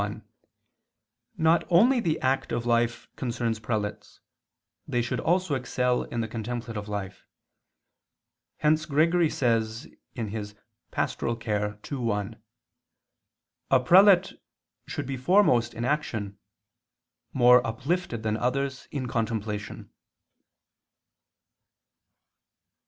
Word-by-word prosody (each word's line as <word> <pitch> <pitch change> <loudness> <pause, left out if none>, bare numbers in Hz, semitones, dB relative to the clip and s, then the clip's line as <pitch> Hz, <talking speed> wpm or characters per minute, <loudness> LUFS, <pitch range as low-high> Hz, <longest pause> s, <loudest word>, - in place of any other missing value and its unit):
1: - - -5 1.1
Not 165 0 +3
only 235 +9 +5
the 160 -8 0
active 130 -3 0
life 120 0 +1
concerns 120 -3 -2
prelates, 105 -2 -4 0.7
they 120 - 0
should 120 0 -1
also 180 -2 +1
excel 125 -1 0
in 120 - -3
the 110 - -2
contemplative 115 -1 -5
life; 100 -2 -6 1.3
hence 155 +1 +2
Gregory 165 +3 +3
says 115 -3 -1 1.0
(Pastor. - - -2
ii, 105 +1 -3
1): 110 -2 -3 1.3
"A 130 - +5
prelate 185 +7 +6 0.5
should - - -4
be 135 0 -4
foremost 130 - +3
in 115 - -3
action, 110 -8 -2 0.9
more 125 -1 +6
uplifted 130 +1 -2
than 110 0 0
others 135 +2 -2
in 135 -3 -4
contemplation." 110 -3 -3
120 Hz, 90 wpm, -27 LUFS, 110-150 Hz, 1.3 s, prelate